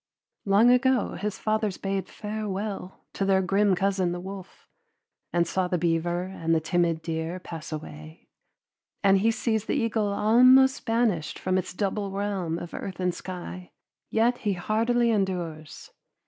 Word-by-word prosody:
Long 205 +5 +5
ago 260 0 +2
his 205 0 -4
fathers 215 -2 -1
bade 195 -1 -3
farewell 210 -2 -5
to - - -2
their 190 -1 +3
grim 195 +1 +3
cousin 190 -2 0
the 175 - -4
wolf, 190 0 -10 0.6
and 170 0 +2
saw 185 +2 -1
the 180 - 0
beaver 170 +1 0
and 165 -3 -1
the - - +3
timid 165 0 0
deer 165 +2 -3
pass 165 -3 -8
away, 75 - -9 0.8
and 195 -1 +5
he 220 +4 +3
sees 220 -1 0
the - - -1
eagle 225 -2 0
almost 255 +6 +5
banished 225 -9 0
from 185 - -1
its 185 - -1
double 200 +2 -2
realm 195 -4 -2
of 175 0 -8
earth 190 -2 -6
and 180 -1 0
sky, 180 0 -8 0.4
yet 235 +2 +2
he 210 -3 0
hardily 230 +6 +1
endures. 175 -7 -3
190 Hz, 150 wpm, -26 LUFS, 175-215 Hz, 0.8 s, Long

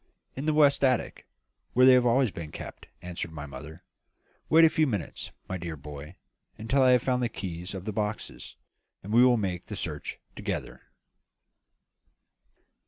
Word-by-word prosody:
"In 135 +4 -4
the 155 - +3
west 145 -2 +5
attic, 130 -3 0 0.5
where 130 +1 +6
they 130 - +9
have 125 -1 +5
always 120 -1 +3
been 85 -5 -7
kept," - - -9 0.2
answered 85 -1 -4
my 75 -2 -7
mother. 75 +3 -10 0.7
"Wait 165 +1 +7
a - - +6
few 155 -1 +2
minutes, 105 -9 -4 0.2
my 95 - -4
dear 85 -2 -5
boy, 75 +3 -9 0.4
until 130 +6 +1
I 130 - +6
have 125 -1 +3
found 125 -1 +1
the 120 - 0
keys 90 0 -6
of 95 0 -7
the 110 - -3
boxes, 105 0 -4 0.5
and 105 +3 -5
we 120 +2 +7
will 125 -1 +5
make 95 -5 -3
the - - -5
search - - -5 0.2
together." - - -4
105 Hz, 170 wpm, -28 LUFS, 85-130 Hz, 0.7 s, they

